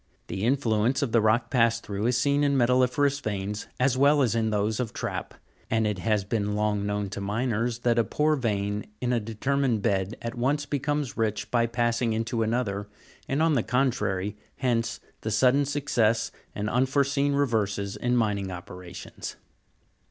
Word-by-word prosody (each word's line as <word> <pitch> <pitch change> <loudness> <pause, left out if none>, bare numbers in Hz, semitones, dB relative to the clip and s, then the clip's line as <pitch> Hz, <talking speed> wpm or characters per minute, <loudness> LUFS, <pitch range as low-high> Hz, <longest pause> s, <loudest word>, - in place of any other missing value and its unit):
The 95 - -3
influence 125 0 +2
of 130 - -1
the 115 - +4
rock 110 +3 +2
passed 115 -2 +2
through 100 +1 -2
is 125 0 +2
seen 140 +3 +2
in 140 -1 +2
metalli'ferous 130 +3 +2
veins, 100 0 -3
as 130 0 +2
well 145 +1 +5
as 120 - +1
in 115 -1 +1
those 105 0 0
of 120 -4 -2
trap; - - -4 0.3
and 110 0 +2
it 105 -3 -1
has 105 0 +1
been 105 0 -1
long 105 -1 0
known 105 0 -1
to 100 - -5
miners, 115 +3 -1
that 120 -1 +2
a - - +4
poor 150 +6 +1
vein 105 -5 -1
in 125 0 0
a 120 - +2
determined 115 +1 0
bed 100 0 0
at 115 0 -4
once 140 +5 0
becomes 145 -1 -2
rich 110 -1 -1
by 115 -1 +3
pass 120 0 0
ing 115 -2 +1
into 115 +1 -1
another, 110 -3 -1 0.4
and 155 +3 +2
the 120 - +3
contrary: 105 -6 0 0.2
hence, 115 -3 0 0.2
the 110 - -3
sudden 130 +6 +3
success 120 -6 +1 0.2
and 105 0 -2
unfore 130 +4 +2
seen 140 +1 +1
reverses 105 -8 0
in 125 0 0
mining 105 -4 0
operations. 90 0 -8
115 Hz, 175 wpm, -27 LUFS, 105-130 Hz, 0.4 s, well